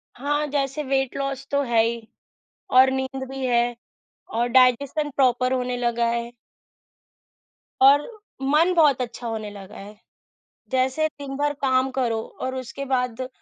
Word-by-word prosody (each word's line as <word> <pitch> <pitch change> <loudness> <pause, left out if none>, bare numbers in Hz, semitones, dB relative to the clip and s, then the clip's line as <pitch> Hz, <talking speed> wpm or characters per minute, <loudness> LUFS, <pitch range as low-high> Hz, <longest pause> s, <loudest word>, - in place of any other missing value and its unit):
हाँ, 290 +3 -1
जैसे 280 +1 -2
weight 270 -1 -1
loss 275 0 -4
तो 280 0 +2
है 235 -3 +3
ही। 230 -1 -3 0.7
और 260 +1 +8
नींद 265 0 -3
भी 270 -1 -4
है 240 -1 +1 0.6
और 240 +1 +2
डाइजेशन 260 +4 +3
प्रॉपर 255 -1 +2
होने 250 -1 -1
लगा 235 -1 0
है। 235 0 -2 1.5
और 280 +2 +6 0.3
मन 305 +7 +3
बहुत 295 -6 +4
अच्छा 240 0 -5
होने 220 -2 -4
लगा 200 +1 -11
है। 205 +1 -11 0.7
जैसे 260 +4 +1
दिन 280 -2 -8
भर 290 0 0
काम 260 0 +2
करो 230 -3 0 0.2
और 260 0 -2
उसके 260 +2 -6
बाद 255 -1 -2
260 Hz, 145 wpm, -23 LUFS, 240-275 Hz, 1.5 s, और